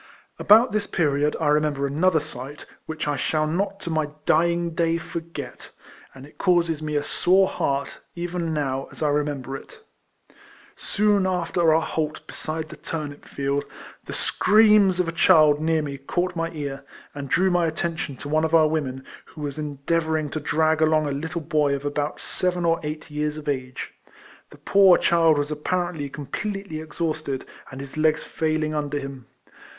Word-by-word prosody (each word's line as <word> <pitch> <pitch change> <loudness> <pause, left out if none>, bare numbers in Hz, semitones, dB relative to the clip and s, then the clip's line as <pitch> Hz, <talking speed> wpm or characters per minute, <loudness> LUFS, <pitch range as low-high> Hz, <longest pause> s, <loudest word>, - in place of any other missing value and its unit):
About 225 +5 +6
this 210 -1 -1
period 150 -2 +1
I 155 -3 +1
remember 150 -2 +1
another 160 +5 +2
sight, 145 -1 -8 0.2
which 160 -1 -4
I 145 -1 0
shall 155 +2 0
not 195 +5 -1
to 170 - -4
my 155 -2 0 0.2
dying 170 0 +2
day 165 0 +1
forget; 170 0 -7 0.5
and 135 0 -11
it 145 - -19
causes 170 -4 +2
me 150 -1 -3
a 145 - +1
sore 190 +5 +3
heart, 140 -4 -2 0.2
even 175 -1 -3
now, 135 -3 -2
as - - -6
I 150 - +3
remember 145 -2 -1
it. 285 - -11 0.9
Soon 205 -2 +1
after 175 -2 +1
our 160 +1 +3
halt 155 -1 -3
beside 155 0 -5
the 155 - -10
turnip 150 -3 -6
field 140 +1 -2 0.4
the - - -6
screams 210 -4 +4
of 180 - +1
a - - -1
child 155 -3 +5
near 160 -1 +1
me 140 -2 -5
caught 175 +6 -2
my 165 0 -1
ear, 140 -4 -5 0.3
and 140 -2 -6
drew 185 +5 +3
my 175 -1 +2
atten 165 +1 -2
tion 145 -3 -4
to 145 - -9
one 155 +2 +1
of 160 +1 +2
our 160 -1 +6
women, 135 -4 -3 0.2
who 155 - -12
was 145 0 -4
endea 150 +3 -1
vouring 155 -2 -2
to 155 - -2
drag 155 +1 +1
along 155 -1 +3
a 145 - -1
little 160 +4 -3
boy 150 -2 +1
of 140 +1 -6
about 145 +1 -2
seven 180 -1 -1
or 165 0 +2
eight 155 0 -6
years 150 0 -2
of 155 - -9
age. 130 -3 -3 0.6
The - - -15
poor 195 -3 +5
child 165 -2 +4
was 145 +1 -1
apparently 160 -1 -2
completely 160 +4 -5
exhausted, 155 -3 -3 0.2
and 130 - -9
his 140 +2 -8
legs 155 0 +2
failing 155 -1 -1
under 145 -1 -2
him. 135 -3 -7
155 Hz, 175 wpm, -24 LUFS, 145-170 Hz, 0.9 s, About